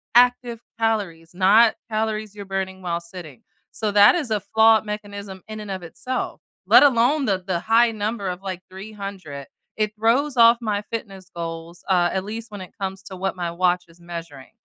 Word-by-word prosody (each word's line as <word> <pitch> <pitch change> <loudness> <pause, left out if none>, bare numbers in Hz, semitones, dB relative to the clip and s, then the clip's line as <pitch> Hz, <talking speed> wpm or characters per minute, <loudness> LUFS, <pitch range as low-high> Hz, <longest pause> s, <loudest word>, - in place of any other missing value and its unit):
active 245 -1 +4 0.2
calories, 195 -8 -2
not 210 +5 +5
calories 215 -1 -2
you're 200 - -7
burning 190 -1 -4
while 170 -1 -2
sitting. 170 - -11 0.3
So, 215 -1 -2
that 205 0 +7
is 285 -10 -2
a 210 -2 +1
flawed 220 0 +4
mechanism 200 -2 -7
in 215 0 -7
and 205 -2 -7
of 190 -1 -4
itself, 250 +9 -5 0.3
let - - +8
alone 270 +2 +3
the 190 -5 0
the 180 -3 -1
high 230 +1 +4
number 210 -1 -3
of, 180 +1 -4
like, 185 -2 -5
300. 190 -7 -8 0.3
It 215 0 -1
throws 250 +5 +1
off 230 0 +7
my 210 -2 -1
fitness 195 -5 -6
goals, 165 0 -7
uh, 175 -2 +3
at 190 0 -1
least 220 +1 -7
when 205 -2 -7
it 185 - -11
comes 190 0 -4
to 190 -1 -9
what 190 +1 -2
my 175 -2 -3
watch 180 0 +1
is 165 +1 -21
measuring. 165 -6 -9
200 Hz, 185 wpm, -23 LUFS, 180-220 Hz, 0.3 s, let